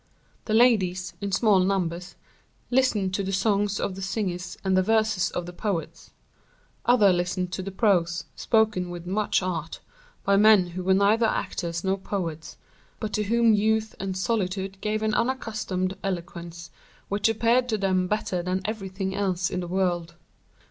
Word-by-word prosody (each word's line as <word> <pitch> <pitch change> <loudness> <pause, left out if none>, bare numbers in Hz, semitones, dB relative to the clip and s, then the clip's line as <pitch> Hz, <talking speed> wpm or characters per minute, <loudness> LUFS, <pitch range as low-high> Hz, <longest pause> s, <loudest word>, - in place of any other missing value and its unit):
The 215 - 0
ladies, 185 -7 +3
in 200 0 -3
small 200 0 +4
numbers, 180 -2 -1 0.6
listened 225 -7 +2
to 200 - 0
the 195 0 -3
songs 200 +1 +1
of 195 - -2
the 195 - -8
singers 190 -3 -3
and 190 -1 +1
the 185 - +5
verses 215 -2 +2
of 175 - -4
the 175 - -8
poets; 190 -3 -4 0.8
others 210 -6 +5
listened 180 +1 -2
to 180 - -3
the 190 - -5
prose, 185 -5 +1
spoken 215 -6 +1
with 175 -1 -7
much 200 +1 0
art, 165 -3 -4 0.4
by 200 0 +3
men 210 -2 +6
who 180 +1 -5
were 190 +1 +3
neither 210 +4 +3
actors 170 -5 -3
nor 195 0 0
poets, 170 -5 -5 0.4
but 215 -1 -4
to 210 - 0
whom 230 +1 +4
youth 220 +1 +1
and 190 -1 -3
solitude 190 -2 -2
gave 215 +1 -1
an 215 0 +1
unaccustomed 215 -7 -1
eloquence, 170 -2 -5 0.4
which 205 +2 +1
appeared 235 +3 +2
to 220 - +1
them 185 -2 +1
better 195 -3 -1
than 185 +2 -2
everything 195 -2 -3
else 190 -2 -1
in 185 - -2
the 175 - -4
world. 175 -2 -1
190 Hz, 160 wpm, -26 LUFS, 180-215 Hz, 0.8 s, men